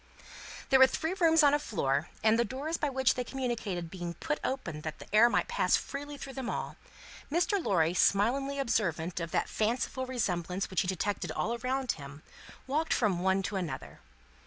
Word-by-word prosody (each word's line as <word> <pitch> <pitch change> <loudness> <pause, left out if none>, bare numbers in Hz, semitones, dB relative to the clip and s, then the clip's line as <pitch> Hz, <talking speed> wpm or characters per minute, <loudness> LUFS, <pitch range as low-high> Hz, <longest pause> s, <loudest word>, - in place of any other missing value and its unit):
There 265 - +7
were 265 - +9
three 320 +6 -2
rooms 330 -4 +4
on 285 -1 +6
a 295 - +3
floor, 145 - -1
and, 220 +1 +4
the - - +4
doors 275 +9 -3
by 295 -3 -1
which 265 -1 +2
they 250 - -2
communicated 230 -10 -3
being 175 -2 -5
put 305 -2 -2
open 170 - -3
that 155 0 -5
the - - -11
air 225 +3 +7
might - - +1
pass 475 +1 +2
freely 290 +1 -5
through 275 -1 -8
them 260 -2 -4
all, - - -4 0.6
Mr. 355 +4 +1
Lorry, 170 -3 +2
smilingly 255 +10 +2
observant 180 - 0
of 165 -1 -4
that - - 0
fanciful 240 +4 -1
resemblance 190 -7 -2
which 185 - +2
he 180 - -3
detected 190 +2 -2
all 230 - -1
around 255 +1 -1
him, 140 0 -9 0.4
walked 305 +4 0
from 200 -7 +1
one 190 +1 +2
to 200 +1 -2
another. 160 -8 -5
235 Hz, 185 wpm, -30 LUFS, 180-270 Hz, 0.6 s, were